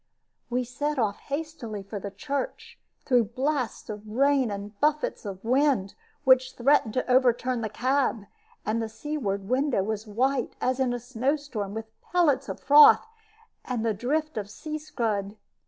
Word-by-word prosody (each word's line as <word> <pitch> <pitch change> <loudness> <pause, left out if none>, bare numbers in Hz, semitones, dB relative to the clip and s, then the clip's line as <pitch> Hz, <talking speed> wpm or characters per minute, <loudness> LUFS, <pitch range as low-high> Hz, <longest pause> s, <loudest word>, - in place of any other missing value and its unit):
We 250 +1 0
set 290 +5 -3
off 210 -4 0
hastily 280 -8 -5
for 200 +1 -6
the 200 - -5
church, 280 - -5 0.3
through 245 -3 +4
blasts 275 -2 -1
of 210 0 -7
rain 270 +2 +3
and 205 0 -6
buffets 300 -5 0
of 190 -1 -7
wind, 255 -5 +2 0.3
which 260 0 +4
threatened 245 -3 +3
to 255 - 0
overturn 250 -1 +3
the 220 - -2
cab, 255 -1 0 0.4
and 220 +2 0
the 225 - -3
seaward 220 -6 -3
window 255 -4 +1
was 215 +1 -3
white, 255 +5 0
as 255 +1 0
in 260 -2 +2
a 245 - -2
snowstorm, 245 -3 -2
with 225 0 -4 0.2
pellets 340 -7 +1
of - - -5
froth, 295 +7 +7 0.6
and 240 -3 -2
the 225 - +2
drift 300 +7 -1
of 205 -1 -6
sea 310 +8 -6
scud. 215 -9 -2
250 Hz, 155 wpm, -27 LUFS, 215-280 Hz, 0.6 s, froth